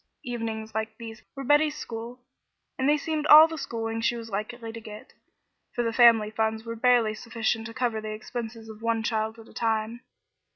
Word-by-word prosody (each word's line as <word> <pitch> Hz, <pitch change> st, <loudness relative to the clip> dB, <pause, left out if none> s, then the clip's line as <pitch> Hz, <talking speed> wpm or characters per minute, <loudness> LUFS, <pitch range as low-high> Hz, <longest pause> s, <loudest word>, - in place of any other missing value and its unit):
Evenings 225 Hz, -2 st, -4 dB
like 220 Hz, 0 st, -3 dB
these 225 Hz, -1 st, -9 dB
were 275 Hz, -, -5 dB
Betty's 295 Hz, +2 st, +3 dB
school, 235 Hz, +2 st, -7 dB, 0.6 s
and 265 Hz, +2 st, +1 dB
they 300 Hz, -, +4 dB
seemed 305 Hz, 0 st, -2 dB
all 310 Hz, +2 st, +10 dB
the 325 Hz, -, -6 dB
schooling 225 Hz, -5 st, -4 dB
she 235 Hz, +1 st, +1 dB
was 230 Hz, -1 st, -8 dB
likely 225 Hz, +3 st, -4 dB
to 230 Hz, 0 st, -9 dB
get, 210 Hz, -1 st, -11 dB, 0.6 s
for 240 Hz, -, 0 dB
the 230 Hz, -1 st, -1 dB
family 230 Hz, -3 st, +6 dB
funds 220 Hz, 0 st, -1 dB
were 230 Hz, 0 st, -5 dB
barely 235 Hz, -2 st, +3 dB
sufficient 225 Hz, 0 st, -2 dB
to 225 Hz, -, -9 dB
cover 240 Hz, -4 st, -1 dB
the 215 Hz, -, -6 dB
expenses 225 Hz, +1 st, -6 dB
of 220 Hz, 0 st, -11 dB
one 230 Hz, -1 st, 0 dB
child 220 Hz, 0 st, -1 dB
at 225 Hz, -, -13 dB
a -, -, -17 dB
time. 225 Hz, +1 st, -1 dB
230 Hz, 195 wpm, -27 LUFS, 220-240 Hz, 0.6 s, all